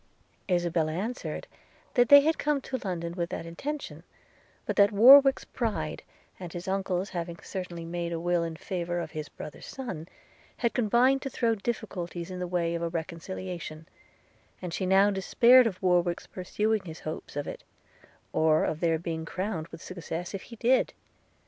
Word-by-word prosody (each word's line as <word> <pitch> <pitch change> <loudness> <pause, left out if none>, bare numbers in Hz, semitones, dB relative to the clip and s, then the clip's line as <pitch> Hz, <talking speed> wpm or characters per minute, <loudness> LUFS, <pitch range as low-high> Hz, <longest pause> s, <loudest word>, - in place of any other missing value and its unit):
Isabella 170 -3 +1
answered, 220 +9 -4 0.5
'that 245 -2 +4
they 285 0 +10
had 320 +3 +1
come 295 -1 +1
to 260 0 -4
London 170 -3 -3
with 170 -1 -2
that - - -5
intention; 285 - -5 0.6
but - - -2
that 200 0 +6
Warwick's 270 +6 +8
pride, 165 -11 -3 0.4
and 180 -2 -7
his 175 +2 -7
uncle's 190 0 -1
having 170 -1 -4
certainly 180 -3 -6
made 170 0 -3
a 165 - -2
will 175 0 +1
in 165 -1 -4
favour 175 +1 -3
of 170 - -5
his 155 -2 -5
brother's 150 - -9
son, 185 -12 -6 0.5
had 235 - 0
combined 250 +3 +3
to 270 - -4
throw 235 -2 +1
difficulties 185 -6 -4
in 180 - -5
the 180 - -2
way 170 -1 0
of 170 - -2
a 170 - -1
reconciliation; 170 -1 -6 0.7
and 180 -2 -6
she 185 - -1
now 195 +2 +5
despaired 235 +6 +6
of 185 -5 -4
Warwick's 175 -1 +2
pursuing 210 +3 -1
his 160 -2 -8
hopes 155 -2 -6
of 145 0 -2
it, - - -7 0.7
or 155 0 +3
of 155 - -1
their 165 -1 +2
being 160 -1 -4
crowned 180 -1 -3
with 170 - -11
success 175 0 -5
if 195 - -4
he 235 - -9
did. 245 +3 +2
180 Hz, 170 wpm, -28 LUFS, 170-220 Hz, 0.7 s, they